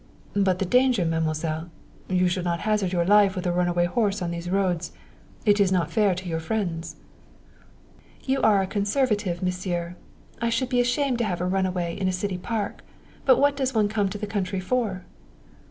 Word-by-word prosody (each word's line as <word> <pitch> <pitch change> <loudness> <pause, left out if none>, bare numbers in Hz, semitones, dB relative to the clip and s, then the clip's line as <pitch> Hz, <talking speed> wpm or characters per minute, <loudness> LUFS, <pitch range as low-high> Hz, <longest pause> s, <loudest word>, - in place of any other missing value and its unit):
"But 195 -2 +2
the 195 - -1
danger, 250 -2 +3
Mademoiselle! 160 0 -1 0.4
You 185 -1 +2
should 180 0 -1
not 170 -1 -1
hazard 210 -4 0
your 175 -2 +1
life 205 0 +5
with 185 - -4
a 175 - +1
runaway 175 0 +1
horse 205 +1 0
on 175 -2 -3
these 170 +1 -5
roads. 180 -3 0 0.5
It 205 -1 +4
is 195 -2 +3
not 170 -3 +1
fair 205 -1 +2
to 185 +1 -7
your 165 -1 -2
friends." 165 -3 -3 1.3
"You 265 0 0
are 205 -3 +4
a - - -1
conservative, 205 -3 0
Monsieur. 180 -1 -2 0.5
I 235 - +1
should 245 +2 0
be 245 -1 +3
ashamed 250 +1 0
to 235 - +1
have 180 -4 -2
a 180 - -1
runaway 180 -2 -1
in 190 - 0
a - - +2
city 185 0 -3
park, 215 +1 -3 0.4
but 260 - +6
what 285 0 +3
does 265 -2 -1
one 210 -2 +3
come 205 -2 0
to 210 - -5
the 210 - -4
country 195 -2 -2
for?" 195 -2 -1
190 Hz, 190 wpm, -25 LUFS, 175-215 Hz, 1.3 s, but